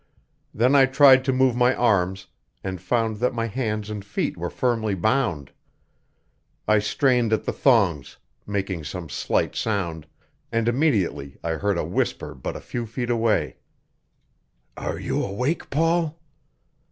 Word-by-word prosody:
Then 125 +5 +2
I 135 -1 +6
tried 135 -1 +6
to 135 - +2
move 130 -1 +2
my 125 +1 +3
arms, 95 -5 +1 0.4
and 95 -2 -5
found 110 +3 0
that 125 +3 0
my 115 -1 -1
hands 110 -3 -3
and 105 -2 -5
feet 100 - -2
were - - -4
firmly 115 -5 0
bound. 100 - 0 1.2
I 110 -1 +4
strained 120 +2 +1
at 110 - +1
the - - -2
thongs, 100 - +2 0.3
making 95 -5 -3
some 85 +2 -6
slight - - -1
sound; 85 -8 -2 0.4
and 115 0 0
immediately 110 - 0
I 85 - -1
heard 95 +4 0
a - - -1
whisper - - -2
but 65 - -6
a - - -7
few 120 -1 -5
feet 120 +2 -3
away: 115 -2 +1 1.2
"Are - - -4
you - - -1
awake, 125 - -2
Paul?" 165 +1 +1
110 Hz, 145 wpm, -24 LUFS, 95-125 Hz, 1.2 s, I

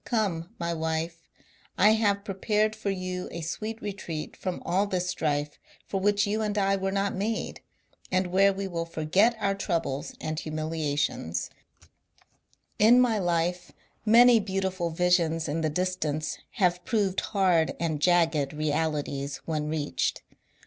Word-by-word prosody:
Come, 190 -8 -1
my 170 -1 -2
wife, 160 +1 -3 0.5
I 210 +3 +6
have 205 -2 +1
prepared 210 +2 0
for 220 -2 -3
you 185 -1 -3
a 170 - -5
sweet 215 +7 -4
retreat 185 -6 -5
from 185 -2 -4
all 190 +4 +1
this 180 -2 -1
strife 150 -4 -1 0.3
for 195 - -2
which 205 +2 +2
you 210 +2 -1
and 210 -1 -1
I 195 -1 +3
were 195 0 -1
not 200 0 0
made, 215 +3 -3 0.5
and 185 0 +2
where 195 +2 +5
we 195 0 -4
will 170 -2 -3
forget 175 +9 +2
our 200 -1 +1
troubles 170 -8 -2
and 155 0 -3
humiliations 155 - -2
I - - -29 0.9
In 230 +4 +7
my 235 -4 +3
life 175 0 -1 0.3
many 235 +2 +7
beautiful 190 -3 -2
visions 165 -1 +2
in 160 +2 -1
the 155 - +1
distance 155 -3 -2
have 180 -4 +1
proved 200 -4 +1
hard 180 -6 +2
and 160 -3 -1
jagged 165 -5 +3
realities 145 -2 -1
when 155 -2 -2
reached. 150 -2 -1
180 Hz, 145 wpm, -27 LUFS, 160-200 Hz, 0.9 s, In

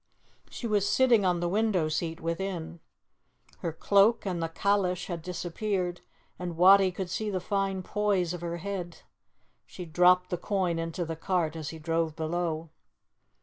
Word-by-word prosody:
She - - -7
was 205 -3 +1
sitting 240 -5 +4
on 175 -2 +1
the 175 - 0
window 195 -3 +1
seat 160 +1 -2
within. 170 0 -4 0.8
Her 170 - -2
cloak 200 +8 +3
and 180 -3 -2
the 165 - -1
calash 190 0 0
had 170 -3 -5
disappeared, 180 +1 -3 0.4
and 175 -2 -5
Wattie 190 +1 +7
could 185 0 -4
see 215 -1 -2
the 190 -2 -1
fine 195 0 -1
poise 195 -4 0
of 175 - -6
her 170 0 -3
head. 180 -2 -6 0.6
She 180 - -8
dropped 180 +2 +4
the 180 - 0
coin 180 -4 0
into 165 +1 -3
the 165 0 -4
cart 165 -2 -1
as 155 -2 -5
he 160 - -7
drove 165 0 -1
below. 160 0 -2
180 Hz, 160 wpm, -28 LUFS, 165-195 Hz, 0.8 s, Wattie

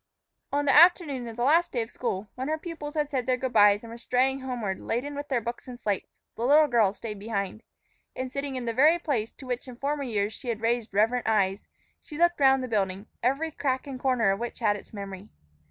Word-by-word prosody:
ON 285 +1 0
the 275 - +4
afternoon 300 -7 +5
of 230 - -7
the 240 - -2
last 330 +6 +4
day 240 - 0
of 225 - -12
school, 205 -4 -3
when 260 +2 -4
her 310 +1 0
pupils 315 -2 -7
had 300 -1 -1
said 260 -3 -1
their 255 -1 +2
good 260 0 -3
bys 205 -1 +5
and 230 - -9
were 235 - -9
straying 260 +3 +1
homeward 240 -7 -3
laden 255 +5 -3
with 285 0 -5
their 260 -4 +1
books 235 +3 -6
and 245 -1 -8
slates, 205 -5 -3 0.2
the 230 - -4
little 295 +5 +6
girl 235 -8 +3
stayed 210 0 -7
behind. 205 0 -3 0.5
And, 255 0 -4
sitting 275 0 -4
in 250 -2 -4
the 230 - -1
very 305 +8 +5
place 260 -10 -1
to 270 - -12
which 250 0 -4
in 250 - -9
former 285 +3 -2
years 215 -5 -1
she 250 +2 -7
had 225 -2 -2
raised 230 0 0
reverent 225 +5 +2
eyes, 200 -2 +1 0.3
she 295 - -10
looked 345 0 +3
round 265 -1 +5
the - - -3
building, 200 -3 -1 0.2
every 275 +7 0
crack 260 -3 -1
and 270 -2 -7
corner 250 -6 +2
of 195 - -2
which 240 0 -5
had 210 -3 +2
its 205 - -11
memory. 200 -1 -8
250 Hz, 235 wpm, -27 LUFS, 220-280 Hz, 0.5 s, little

